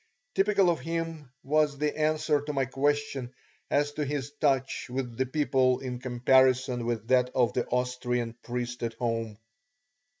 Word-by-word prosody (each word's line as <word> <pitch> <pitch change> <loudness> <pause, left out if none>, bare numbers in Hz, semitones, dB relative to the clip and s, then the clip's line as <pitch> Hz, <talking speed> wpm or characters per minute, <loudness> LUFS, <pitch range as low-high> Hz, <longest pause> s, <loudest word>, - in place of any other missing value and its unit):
Typical 195 -2 +3
of 165 - -2
him 165 -3 -4
was 150 0 +2
the 150 +1 -1
answer 155 -1 +1
to 150 +1 -4
my 135 -1 +1
question 140 -1 -1 0.4
as 145 +1 +2
to 150 +1 -3
his 145 0 -3
touch 135 -3 +1
with 125 -2 -3
the 130 +2 0
people 130 -3 +2
in 125 -2 -5
comparison 130 0 +3
with 115 -2 -2
that 125 -1 +4
of 125 -3 +3
the 125 - -1
Austrian 125 -1 -1
priest 120 0 -4
at 115 -1 -3
home. 115 -3 -2
130 Hz, 155 wpm, -28 LUFS, 125-145 Hz, 0.4 s, that